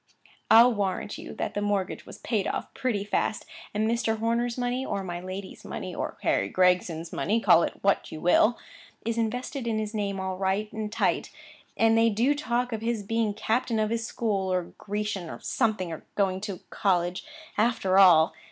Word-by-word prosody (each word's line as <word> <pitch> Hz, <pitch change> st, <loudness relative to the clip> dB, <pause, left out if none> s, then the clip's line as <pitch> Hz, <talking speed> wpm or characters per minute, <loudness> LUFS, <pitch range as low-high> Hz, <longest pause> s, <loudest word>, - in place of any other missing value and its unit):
I'll 235 Hz, +2 st, +8 dB
warrant 200 Hz, -1 st, -2 dB
you -, -, -8 dB
that -, -, -3 dB
the 205 Hz, -, -2 dB
mortgage 200 Hz, -2 st, -1 dB
was -, -, -10 dB
paid 215 Hz, -5 st, -1 dB
off -, -, -4 dB
pretty 225 Hz, -6 st, -1 dB
fast; 205 Hz, +1 st, -1 dB, 0.3 s
and 215 Hz, +1 st, 0 dB
Mr. 225 Hz, -1 st, 0 dB
Horner's 235 Hz, +2 st, 0 dB
money—or 245 Hz, -5 st, -2 dB
my 175 Hz, -2 st, -4 dB
lady's 190 Hz, +1 st, -7 dB
money, -, -, -6 dB
or -, -, -4 dB
Harry 100 Hz, -, +1 dB
Gregson's 180 Hz, -, +1 dB
money, 220 Hz, +3 st, +1 dB
call 170 Hz, -, +6 dB
it -, -, -2 dB
which 200 Hz, 0 st, +1 dB
you 155 Hz, -, -6 dB
will—is 225 Hz, +4 st, 0 dB
invested 245 Hz, +3 st, -2 dB
in 225 Hz, -1 st, 0 dB
his 215 Hz, 0 st, -3 dB
name, 200 Hz, -2 st, -2 dB
all 190 Hz, -1 st, -3 dB
right 195 Hz, +2 st, -1 dB
and 215 Hz, -1 st, -4 dB
tight; 225 Hz, -, 0 dB, 0.5 s
and 225 Hz, 0 st, +4 dB
they 225 Hz, 0 st, +5 dB
do 235 Hz, +7 st, +2 dB
talk 250 Hz, -4 st, -1 dB
of 220 Hz, -, -3 dB
his 230 Hz, -2 st, -1 dB
being 220 Hz, 0 st, 0 dB
captain 225 Hz, +2 st, 0 dB
of 215 Hz, 0 st, +1 dB
his 230 Hz, 0 st, -1 dB
school, 200 Hz, -4 st, -1 dB
or 180 Hz, -2 st, -2 dB
Grecian, 205 Hz, -4 st, -3 dB
or -, -, -7 dB
something, 215 Hz, -7 st, 0 dB
and 160 Hz, -, -6 dB
going 190 Hz, -2 st, +1 dB
to 200 Hz, -3 st, -5 dB
college, 180 Hz, -2 st, 0 dB, 0.3 s
after 205 Hz, -4 st, +2 dB
all! 165 Hz, -5 st, +7 dB
210 Hz, 180 wpm, -27 LUFS, 190-230 Hz, 0.5 s, I'll